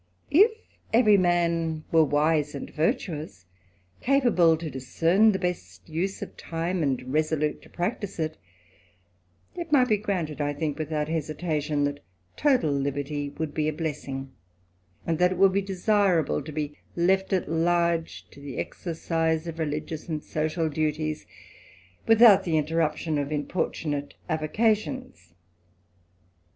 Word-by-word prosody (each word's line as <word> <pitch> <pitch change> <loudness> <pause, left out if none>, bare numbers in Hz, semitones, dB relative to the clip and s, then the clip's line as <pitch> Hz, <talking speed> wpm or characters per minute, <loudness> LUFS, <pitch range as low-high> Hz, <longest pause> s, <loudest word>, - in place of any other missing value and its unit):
If 400 +10 +6 0.4
every 220 -2 +6
man 170 -3 +1
were 160 -1 +6
wise 150 0 +1
and 140 - -5
virtuous, 155 - -2 0.6
capable 240 - +4
to 165 0 -6
discern 165 - +3
the 190 - -1
best 180 -2 -4
use 175 +5 -2
of - - -10
time, 170 +2 -3
and 130 -3 -1
resolute 155 -1 0
to - - -17
practise 200 +2 -3
it; 160 -1 -2 1.2
it 340 -3 -6
might 255 -4 +4
be 215 - +4
granted, 175 -8 -3
I 145 0 0
think, 150 0 -3
without 155 -1 -2
hesitation, 155 -1 -1
that 145 0 -1 0.4
total 260 - +2
liberty 140 +1 -2
would 155 -2 -3
be 155 -1 0
a 155 - 0
blessing; 140 -4 -4 0.7
and 165 -1 -1
that 180 +1 +4
it - - -7
would 195 0 +5
be 200 - +2
desirable 195 -5 +1
to 150 +2 -8
be 150 -1 -4 0.2
left 190 +3 +2
at 190 -2 +1
large 170 +1 0
to - - -14
the 140 -2 -7
exercise 165 -1 -2
of 165 -1 -6
religious 155 +1 -4
and 155 -2 -3
social 155 +1 -1
duties, 155 0 -2 0.8
without 225 -3 +7
the 165 -4 +1
interruption 155 0 0
of 145 +1 -3
importunate 150 -1 -2
avocations. 215 - -1
160 Hz, 135 wpm, -26 LUFS, 150-185 Hz, 1.2 s, without